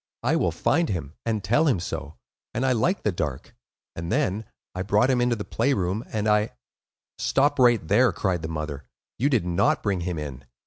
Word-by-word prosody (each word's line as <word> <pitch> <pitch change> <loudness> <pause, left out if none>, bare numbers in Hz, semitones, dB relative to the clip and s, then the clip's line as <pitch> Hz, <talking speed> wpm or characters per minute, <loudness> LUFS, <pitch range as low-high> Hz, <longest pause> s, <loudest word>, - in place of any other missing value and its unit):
I - - +2
will - - +2
find 165 +1 +1
him, 80 -6 -3
and 110 -3 0
tell 120 +12 +3
him 125 -11 +2
so; 80 -3 -5 0.4
and 125 +4 0
I 130 - +3
like 150 - +1
the 105 - +2
Dark.' 75 -7 -4 0.4
And 85 +2 -5
then—I 110 -7 -2
brought 105 +7 +3
him 125 -1 +2
into 120 -1 +2
the 105 - -5
play 140 - +1
room, 95 +4 -1
and 110 -1 -1
I—" 105 +1 +2 0.7
"Stop 145 +1 +2
right 120 -9 +4
there!" 125 +6 +4
cried 90 -4 -1
the 80 - -4
mother. 75 -3 -5 0.3
"You 135 +5 +3
did 120 -10 +2
not 90 +3 +1
bring 100 -4 0
him 85 -1 -3
in. 70 -4 -6
105 Hz, 195 wpm, -25 LUFS, 85-120 Hz, 0.7 s, right